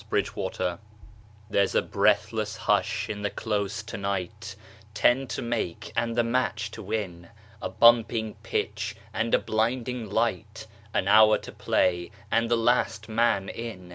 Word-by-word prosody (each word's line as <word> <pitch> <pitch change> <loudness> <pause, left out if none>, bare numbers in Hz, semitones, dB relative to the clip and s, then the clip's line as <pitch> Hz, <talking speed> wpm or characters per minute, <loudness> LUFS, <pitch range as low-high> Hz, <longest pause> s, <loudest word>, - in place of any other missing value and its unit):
Vitaï - - 0
Lampada 90 -1 -3 0.7
There's 100 -2 +1
a - - +5
breathless 110 -1 +1
hush - - +1
in 105 -1 -5
the 100 - 0
Close 105 0 -2
to 115 +1 -7
night 100 +2 -4 0.4
Ten 130 +4 +3
to - - -4
make 110 -3 -3
and 115 -1 0
the 120 - +3
match 115 -3 -1
to 110 - -8
win 95 -5 -4 0.3
A - - -3
bumping 115 -2 +4
pitch 105 -2 -2 0.2
and 115 +1 +1
a - - +5
blinding 120 +1 -1
light, 110 0 -1 0.3
An 95 - 0
hour 110 +1 +7
to - - -10
play 85 0 +1 0.2
and 115 0 +2
the 120 - +3
last 115 -2 +1
man 110 -3 +2
in. 105 -7 -7
110 Hz, 150 wpm, -27 LUFS, 100-115 Hz, 0.7 s, hour